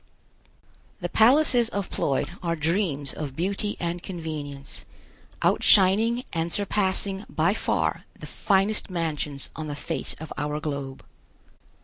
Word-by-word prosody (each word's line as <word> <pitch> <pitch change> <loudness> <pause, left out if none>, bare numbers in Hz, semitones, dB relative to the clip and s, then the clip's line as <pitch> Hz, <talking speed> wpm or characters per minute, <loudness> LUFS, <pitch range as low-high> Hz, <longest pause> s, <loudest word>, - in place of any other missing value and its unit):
The - - -3
palaces 245 0 +5
of 200 -4 -3
Ploid 135 - 0
are 170 -2 -1
dreams 155 -3 0
of 140 -4 -5
beauty 200 +5 -2
and 170 0 -2
convenience, 155 -6 -6 0.6
outshining 220 +5 +4
and 165 0 -1
surpassing 195 0 0
by - - +2
far - - -1
the - - -9
finest 200 +2 +1
mansions 155 -5 -2
on 155 -1 -5
the 145 - -4
face - - -2
of 160 0 -8
our 150 +1 -2
globe. 140 -3 -5
170 Hz, 120 wpm, -26 LUFS, 150-200 Hz, 0.6 s, palaces